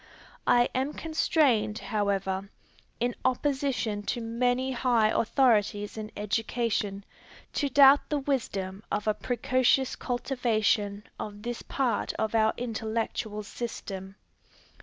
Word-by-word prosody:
I 240 0 +5
am 265 +3 -1
constrained, 290 -9 +1
however, 195 -3 -1 0.5
in 245 +1 0
opposition 260 -5 0
to 245 - -1
many 245 +3 0
high 235 -3 +2
authorities 210 -4 +2
in 215 -1 -5
education, 210 -1 -1 0.5
to 285 - 0
doubt 275 +1 +6
the 295 - +1
wisdom 205 -9 -2
of 210 +1 -1
a 215 - +4
precocious 255 +3 +1
cultivation 225 -5 0 0.2
of 205 0 -6
this 240 0 -4
part 250 -6 -1
of 220 0 -2
our 220 -1 +4
intellectual 220 -2 -3
system. 195 -3 -6
230 Hz, 110 wpm, -28 LUFS, 210-255 Hz, 0.5 s, doubt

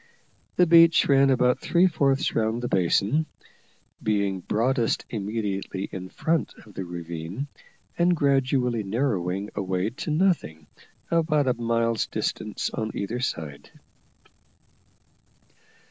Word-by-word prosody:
The 180 - +5
beach 165 -1 +6
ran 135 -1 +5
about 125 -1 +3
three 175 +1 +3
fourths 140 -6 +1
round 115 +2 0
the - - -1
basin, 100 - +1 0.7
being 100 -3 0
broadest 115 +5 0
immediately 100 -3 -3
in 95 0 -6
front 165 - -1
of 105 - -16
the 95 - -4
ravine, 85 - -6 0.5
and 175 +1 +4
gradually 135 -5 +1
narrowing 100 -3 -1
away 95 +1 -1
to 130 - -6
nothing 150 - 0 0.5
at 170 - +4
about 155 -4 +1
a 125 - +3
mile's 115 -1 0
distance - - -3
on 110 0 -3
either 110 +5 -3
side. 75 - -4
115 Hz, 115 wpm, -25 LUFS, 95-140 Hz, 0.7 s, beach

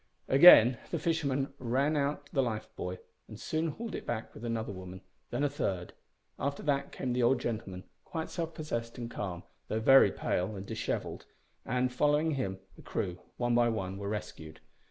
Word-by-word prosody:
Again 130 -5 +9
the - - -1
fishermen 140 -5 0
ran 135 +5 +1
out 145 0 -1
the 135 - +3
life 110 -4 -2
buoy 90 +1 -4 0.3
and - - -10
soon 160 +1 -1
hauled 225 +9 -5
it - - -4
back 115 -1 -3
with - - -11
another 115 -2 -2
woman; 95 -1 -9 0.3
then 145 - -1
a - - +4
third. 95 -11 -3 0.5
After 140 0 -2
that 140 -2 0
came 125 -2 -3
the 125 - +1
old 120 +2 +4
gentleman, 105 -6 -4 0.2
quite 160 -2 -5
self 165 -2 -4
possessed 115 -7 -4
and 120 -1 -5
calm, 90 -4 -5 0.2
though 110 - -1
very 135 +4 +7
pale 95 +4 -1
and 95 0 -6
dishevelled; - - -4 0.4
and, 125 +1 0
following 150 +4 +2
him, 125 -10 -2 0.2
the - - -14
crew, 90 0 -3 0.2
one 120 -1 +1
by 120 0 +4
one, 95 -4 -3
were 100 0 -4
rescued. 80 -7 -6
120 Hz, 180 wpm, -31 LUFS, 105-140 Hz, 0.5 s, Again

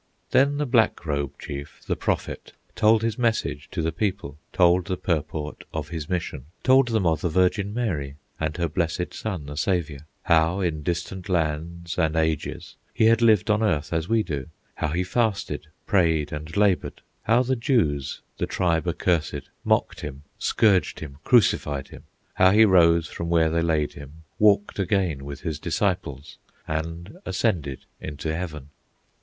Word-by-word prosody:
Then 140 +2 +4
the 150 - 0
Black 120 -8 +2
Robe 70 -3 -2
chief, 70 0 -7
the - - 0
Prophet, - - -3 0.2
Told 110 +1 +4
his 115 +2 -1
message 115 -2 0
to 80 - -3
the 80 - 0
people, 85 -5 -3
Told 90 0 +4
the 95 - -1
purport 75 -3 -3
of 75 -2 -3
his 80 -4 -5
mission, 85 -7 -3 0.2
Told 130 0 +5
them 110 -5 0
of 80 -3 +2
the 85 - 0
Virgin 95 +4 +2
Mary, 85 - -2 0.2
And 80 +1 -2
her 85 -1 0
blessed 85 +2 -2
Son, 95 -9 -4
the 75 +1 -7
Saviour, 80 -3 -1 0.2
How 85 +3 +3
in 85 -5 -1
distant 90 +4 -4
lands 85 +1 -2
and 80 -2 +1
ages 80 -2 -2 0.2
He 110 - +3
had 115 +1 +5
lived 110 -2 +4
on 105 +1 +2
earth 80 -8 0
as 80 +1 -1
we 115 -1 +3
do; 70 -8 -4 0.3
How - - -2
he 85 +5 0
fasted, 110 +2 -1 0.2
prayed, 80 -6 +2
and 75 +4 -6
labored; 100 -3 +1 0.2
How 120 +3 +3
the 130 +1 0
Jews, 105 - 0 0.2
the - - 0
tribe 85 -2 0
accursed, 85 -1 -1
Mocked - - +1
him, 70 -1 -7 0.2
scourged 100 -4 +2
him, 70 -3 -8
crucified 75 - +2
him; - - -13 0.3
How 95 0 +5
he 110 +3 +6
rose 85 -4 +5
from 85 +1 -5
where 80 -2 +3
they 85 +1 +1
laid 80 -3 +1
him, 70 +3 -12 0.2
Walked 105 -1 +3
again 90 -7 0
with 70 0 -7
his 80 -4 -3
disciples, 85 -6 -2 0.3
And 85 - -4
ascended 85 - -1
into 75 +1 -4
heaven. 75 -5 -6
85 Hz, 165 wpm, -25 LUFS, 75-100 Hz, 0.3 s, he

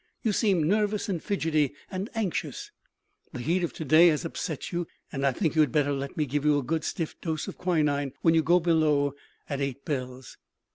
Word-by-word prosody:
You 220 - +2
seem 195 -7 +2
nervous, 210 +2 +1
and 175 -5 -1
fidgety, 155 -8 0 0.2
and 190 +3 -3
anxious. 210 -6 -3 0.6
The - - -5
heat 170 +8 0
of 170 - -1
to 160 - -6
day 155 +5 +7
has 160 0 +1
upset 165 -2 -4
you; 175 -1 -2 0.2
and 135 -2 -3
I 140 - +4
think 150 +4 -1
you 160 - +4
had 145 -5 +2
better 145 -2 +2
let 140 0 -5
me 155 - +1
give 145 +1 -2
you 150 -1 +4
a 145 - -1
good 160 +4 -1
stiff 165 -2 -4
dose 160 -2 -3
of - - -8
quinine 145 -6 +1
when 165 - +5
you 165 - +4
go 175 +3 +4
below, 155 -4 +2 0.3
at 140 -1 -3
eight 140 0 -3
bells." 130 -4 -5
155 Hz, 210 wpm, -27 LUFS, 140-175 Hz, 0.6 s, day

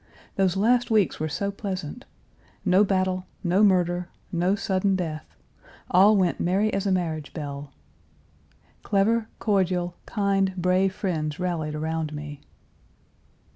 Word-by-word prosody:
Those 190 -1 +1
last 240 +4 +3
weeks 215 -5 +2
were 155 +1 -1
so 200 +7 -2
pleasant. 190 -6 -5 0.6
No 185 +3 +5
battle, 185 -2 0 0.2
no 185 +2 +2
murder, 180 -3 +2 0.2
no 175 +3 +1
sudden 195 -1 0
death, 160 -5 -5 0.6
all 200 +4 +6
went 180 -3 +1
merry 195 +5 +1
as 195 +1 -1
a - - +2
marriage 160 -5 -2
bell. 145 -2 -6 1.1
Clever, 220 +3 +1
cordial, 180 -4 0
kind, 195 -2 +1
brave 185 +2 +2
friends 155 -6 -2
rallied 165 -4 -2
around 160 0 -2
me. 150 -1 -7
185 Hz, 125 wpm, -25 LUFS, 165-195 Hz, 1.1 s, all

